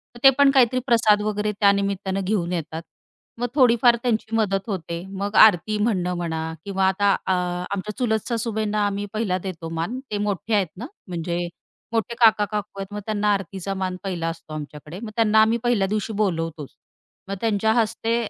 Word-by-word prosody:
तर - - -11
ते 270 - +10
पण 280 -1 +6
काहीतरी 255 -2 +4
प्रसाद 220 -4 +4
वगैरे 210 0 -1
त्यानिमित्ताने 200 -1 +1
घेऊन 185 -3 -1
येतात. 160 -1 -4 0.6
मग 245 - 0
थोडीफार 240 -3 +5
त्यांची 225 -2 -1
मदत 200 -3 +1
होते. 170 -4 -4
मग 200 +2 -3
आरती 215 0 +6
म्हणणं 185 -5 0
म्हणा 160 -1 -3
किंवा 195 -1 +1
आता 200 +1 +3
अ, 190 - 0 0.4
आमच्या 200 +1 -4
चुलत 220 -4 0
सासूबाईंना 215 -2 -1
आम्ही 200 0 -3
पहिला 215 -4 0
देतो 175 -3 -6
मान 165 +10 -3
ते 210 - -1
मोठे 205 +1 -2
आहेत 200 -3 +2
ना, 230 - -6 0.2
म्हणजे 175 0 -3 0.5
मोठे 230 +1 -1
काका-काकू 210 -2 +2
आहेत. 195 - -4
मग 210 - -3
त्यांना 210 -1 +1
आरतीचा 195 0 -4
मान 190 -1 -3
पहिला 175 -4 -3
असतो 165 -2 -9
आमच्याकडे. 150 +2 -8
मग 220 -1 -7
त्यांना 220 -1 +4
आम्ही 220 +2 +3
पहिल्या 235 -5 +2
दिवशी 215 +2 -2
बोलवतोचं. 165 -8 -2 0.5
मग 195 - -2
त्यांच्या 220 -1 +1
हस्ते 225 0 0
205 Hz, 170 wpm, -23 LUFS, 185-220 Hz, 0.6 s, ते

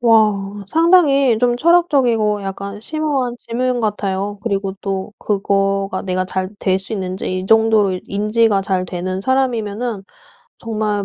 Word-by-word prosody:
와 210 -3 +2
상당히 295 -7 +4
좀 240 +1 +2
철학적이고 250 -10 +2
약간 200 +1 -6
심오한 275 -2 -2
질문 245 +1 -2
같아요. 205 -1 -2
그리고 195 -3 -2
또 195 +1 -3
그거가 195 -1 0
내가 185 -1 -1
잘 185 0 -3
될 190 -1 +1
수 190 +3 -7
있는지 185 -2 -3
이 185 - -7
정도로 220 -4 +3
인지가 210 0 +1
잘 190 -2 -1
되는 185 +1 -4
사람이면은 235 -3 -1 0.6
정말 215 -3 -2
210 Hz, 285 characters per minute, -18 LUFS, 195-240 Hz, 0.6 s, 상당히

